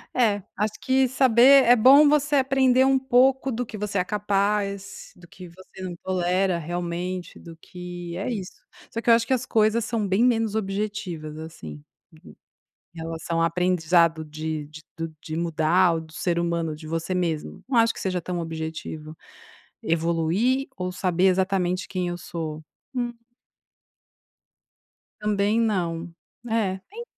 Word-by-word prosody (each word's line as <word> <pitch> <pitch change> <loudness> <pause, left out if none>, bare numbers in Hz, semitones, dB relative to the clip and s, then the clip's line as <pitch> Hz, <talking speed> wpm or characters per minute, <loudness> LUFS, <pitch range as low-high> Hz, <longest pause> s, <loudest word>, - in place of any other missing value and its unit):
É, 215 -5 +2 0.2
acho 210 +1 0
que 265 0 +3
saber 260 +1 +6
é 245 0 +6
bom 275 +6 +7
você 290 0 +2
aprender 260 -1 +3
um 270 0 +4
pouco 265 +1 +3
do 245 +1 -2
que 220 - -8
você 205 -1 -3
é - - +2
capaz, 200 0 -2
do 175 -1 -16
que 185 0 -12
você 185 +2 -14
não 180 -2 -5
tolera 185 0 +1
realmente, 175 +2 -4
do 165 -1 -11
que 175 0 -8
é 195 - -3
isso. 195 -6 -5 0.4
Só 230 - -3
que 235 - -1
eu - - +9
acho 230 0 +3
que 265 - +2
as 255 -1 -1
coisas 220 0 +2
são 220 -1 -1
bem 195 +4 +2
menos 225 -3 +1
objetivas, 195 -7 -4
assim. 80 - -9 1.1
Em 170 - -11
relação 165 +1 -3
a - - +4
aprendizado 170 -1 +2
de 155 0 -5
de 155 +1 -12 0.2
do 165 -1 -5
de 155 - -6
mudar 170 +2 +2
ou 165 - -2
do 160 0 -14
ser 170 0 -1
humano 170 -2 -1
de 155 +1 -11
você 165 +3 -3
mesmo, 165 -4 -3
não 255 - +1
acho 230 0 +3
que - - -9
seja 185 -2 -1
tão 175 +1 -4
objetivo, 160 -1 -6 0.7
evoluir 170 +11 +1
ou 180 0 -3
saber 180 0 0
exatamente 185 -1 +1
quem 180 -2 -2
eu 175 - -4
sou. 160 -3 -6 0.3
Hum. 245 -2 -2 2.1
Também 210 +1 +1
não. 175 -7 -1 0.4
É. 210 -4 0
Tem 455 +5 -8
185 Hz, 155 wpm, -24 LUFS, 165-225 Hz, 2.1 s, eu